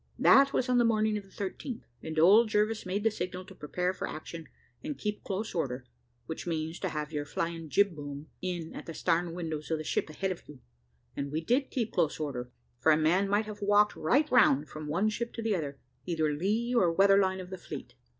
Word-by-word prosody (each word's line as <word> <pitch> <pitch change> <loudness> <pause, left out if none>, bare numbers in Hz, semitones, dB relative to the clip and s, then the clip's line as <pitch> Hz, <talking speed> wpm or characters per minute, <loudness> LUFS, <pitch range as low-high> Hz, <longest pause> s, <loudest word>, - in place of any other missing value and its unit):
That 275 0 +6
was 255 - 0
on 250 -1 +3
the - - +5
morning 215 -2 +2
of 210 - -3
the - - -20
13th, 205 +6 -5 0.2
and 160 0 -6
old 205 +8 +7
Jervis 210 -1 +1
made 200 +3 -1
the 225 - +3
signal 185 -2 -5
to - - -12
prepare 180 +5 -2
for - - -4
action, 160 +1 -8 0.3
and 295 0 -4
keep 210 -1 -3
close 205 +2 -3
order, 130 -6 -2 0.4
which 160 +2 -6
means, 160 0 -2
to - - -2
have 150 0 -4
your 150 -2 -2
flying 165 +2 -4
jib 200 +1 +3
boom 145 0 -7 0.2
in 175 -3 -4
at - - -8
the 165 - -6
starn 170 +1 0
windows 160 -3 -4
of 160 - +1
the 155 - -5
ship 155 - -1
ahead 190 +5 -2
of 175 - -8
you; 145 -3 -11 0.6
and 140 0 -3
we 155 - 0
did 250 - +1
keep 235 -4 -2
close 165 -4 +1
order, 125 -5 -4 0.3
for 160 - +4
a 155 - +5
man 175 +6 +2
might 205 +2 +2
have 210 0 -8
walked 205 +1 +4
right 275 - +2
round 150 - +5
from 155 0 -7
one 175 +8 +1
ship 235 +2 -2
to 230 - -4
the 220 -1 +1
other, 145 -5 -4 0.3
either 160 -3 +1
lee 215 +10 0
or 185 -8 +4
weather 195 +3 +5
line 190 -1 +1
of 185 0 -8
the - - -3
fleet. - - -8
180 Hz, 230 wpm, -30 LUFS, 155-210 Hz, 0.6 s, old